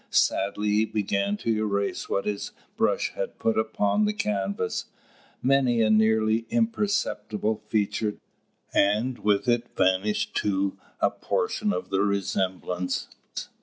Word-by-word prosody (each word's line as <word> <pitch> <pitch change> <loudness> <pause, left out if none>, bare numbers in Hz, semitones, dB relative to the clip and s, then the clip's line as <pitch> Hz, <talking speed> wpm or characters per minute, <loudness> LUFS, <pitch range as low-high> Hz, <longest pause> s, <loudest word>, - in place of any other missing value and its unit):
Sadly 100 +2 +2
he 105 +1 +3
began 100 -1 0
to 115 +1 0
erase 100 -2 -1
what 100 - 0
his 105 -1 -3 0.2
brush - - +1
had - - -4
put 115 - +1
upon 110 - +1
the 210 - +1
canvas. 100 - -1 0.6
Many 130 -3 +3
a 110 - +3
nearly 110 +1 +3
imperceptible 205 - 0
feature 105 0 0 0.6
disappeared, 100 +1 +4
and 125 +3 -3
with 105 +3 +1
it 120 0 0
vanished 95 +3 +1
too 100 -1 0 0.2
a - - +4
portion 435 - -1
of - - -4
the 95 0 +2
resemblance. 95 -2 -1
105 Hz, 130 wpm, -26 LUFS, 100-115 Hz, 0.6 s, disappeared